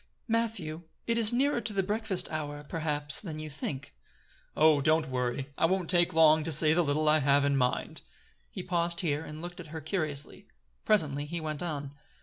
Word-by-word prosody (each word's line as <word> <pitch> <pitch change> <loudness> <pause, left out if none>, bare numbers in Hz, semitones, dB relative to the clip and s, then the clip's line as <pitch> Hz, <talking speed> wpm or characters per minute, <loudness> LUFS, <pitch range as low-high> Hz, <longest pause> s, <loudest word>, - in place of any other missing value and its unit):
"Matthew, 210 -9 -2 0.2
it 230 - 0
is 220 -1 +7
nearer 260 +1 +1
to 225 - -3
the 195 -1 +1
breakfast 210 -1 0
hour, 145 -2 -4
perhaps, 150 -3 -2
than 160 -7 -6
you 155 0 -7
think." 140 - -5 0.6
"Oh! 155 -2 +5
don't 155 +1 +2
worry. 130 +2 -2
I - - +4
won't 185 -1 0
take 175 0 +3
long 160 -2 +5
to 165 - -3
say 155 +1 +3
the 175 +2 +3
little 155 +1 0
I 155 +1 +5
have 140 0 +3
in 140 0 +2
mind." 125 -2 -1 0.5
He - - -7
paused 170 -1 0
here, 150 -3 -1
and 155 +1 -9
looked 175 0 -7
at 175 - -8
her 160 +1 -6
curiously. 155 -3 -3 0.4
Presently 145 -9 +2
he 170 +2 -4
went 155 -2 -4
on. 145 -5 -4
155 Hz, 190 wpm, -29 LUFS, 145-175 Hz, 0.6 s, is